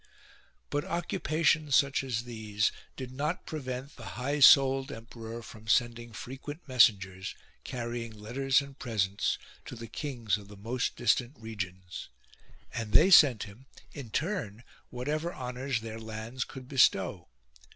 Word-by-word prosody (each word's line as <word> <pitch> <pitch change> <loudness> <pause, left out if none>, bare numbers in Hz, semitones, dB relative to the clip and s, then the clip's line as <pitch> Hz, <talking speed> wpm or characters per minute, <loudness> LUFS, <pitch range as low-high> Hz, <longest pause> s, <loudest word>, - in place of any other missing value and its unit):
5. - - -30 0.6
But 145 0 0
occupations 155 -4 +1
such 140 -1 +3
as 120 -3 -2
these 110 -3 -1 0.2
did 130 -2 -6
not 150 +6 -2
prevent 135 -2 -5
the 115 - -9 0.2
high 145 +3 0
souled 135 -1 +7
emperor 115 0 -8
from 110 0 -12
sending 120 +1 +1
frequent 135 +8 -8
mes 125 -3 +8
sengers, 95 -2 -8 0.3
carrying 120 -2 -4
letters 130 +6 +1
and 140 -1 -11
presents, 100 -5 0 0.3
to - - -7
the 115 0 -7
kings 115 -4 -2
of 100 - -13
the 105 0 -12
most 115 +5 -2
distant 120 +3 +1
regions; 95 -5 -6 0.6
and 115 -3 -4
they 190 - +7
.sent 140 - +8
him 110 +6 -12 0.3
in 135 -5 -7
turn 135 - -2 0.3
whatever 150 +7 -2
honours 125 0 -3
their 115 0 -6
lands 110 +3 -5
could 130 -2 -10
bestow. 95 - +3
120 Hz, 140 wpm, -30 LUFS, 110-135 Hz, 0.6 s, mes